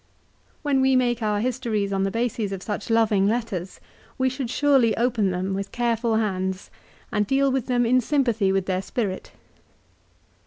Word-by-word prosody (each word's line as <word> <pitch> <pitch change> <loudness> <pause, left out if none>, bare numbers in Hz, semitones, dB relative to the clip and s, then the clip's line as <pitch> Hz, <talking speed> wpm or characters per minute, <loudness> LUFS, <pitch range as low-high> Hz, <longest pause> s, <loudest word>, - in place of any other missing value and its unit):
When 280 -3 +2
we 265 0 +3
make 245 -2 +1
our 210 -1 0
histories 225 -5 -1
on 195 - 0
the 195 - +1
bases 230 -1 -2
of 190 -1 -5
such 210 0 -4
loving 220 -4 +3
letters, 210 -5 -3 0.4
we 260 0 +2
should 260 -1 -4
surely 265 -5 +3
open 230 -4 +1
them 185 +1 -2
with 195 +1 -4
careful 235 -1 0
hands, 190 -3 -2 0.4
and 210 -1 0
deal 275 +2 +2
with 265 -2 -1
them 245 -1 +2
in 255 +2 +3
sympathy 235 -7 +1
with 190 -1 0
their 185 -1 -1
spirit. 195 -2 -4
225 Hz, 165 wpm, -24 LUFS, 195-250 Hz, 0.4 s, we